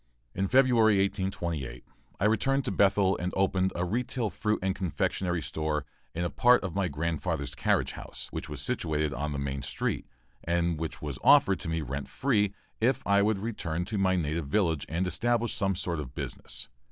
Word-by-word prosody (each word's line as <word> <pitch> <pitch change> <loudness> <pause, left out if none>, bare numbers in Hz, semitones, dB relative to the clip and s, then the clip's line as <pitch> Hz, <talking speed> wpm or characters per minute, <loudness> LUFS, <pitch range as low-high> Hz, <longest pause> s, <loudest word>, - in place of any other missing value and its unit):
In 95 +1 0
February, 120 -3 +5
1828, 85 -9 -2 0.3
I 95 - +1
returned 135 +5 +2
to - - 0
Bethel 95 0 +3
and 90 +1 -2
opened 95 -1 +2
a 85 - 0
retail 115 +2 -1
fruit 105 0 0
and 95 0 +1
confectionery 90 -1 -1
store 75 -2 -2 0.3
in 85 - -1
a 85 - -1
part 125 -1 +5
of 95 -4 -3
my 95 -1 +1
grandfather's 80 +1 -2
carriage - - +1
house, - - -7
which 80 - -5
was 75 -1 -4
situated 75 - -1
on 75 +3 -2
the 70 - -2
main 70 -1 -3
street, 65 - -2 0.4
and 85 -1 0
which 80 -2 -5
was 70 -3 -4
offered 115 -10 +6
to - - -4
me 80 0 -1
rent 70 -1 -4
free 105 -7 +1 0.3
if 120 +3 +1
I 100 0 +4
would 105 0 +2
return 90 -6 -3
to 105 +1 -2
my 95 -1 +3
native 80 -2 -1
village 80 -4 +1
and 85 +5 0
establish 115 +6 0
some 95 -2 0
sort 85 -3 -2
of 65 -3 -7
business. - - -4
95 Hz, 185 wpm, -29 LUFS, 80-105 Hz, 0.4 s, offered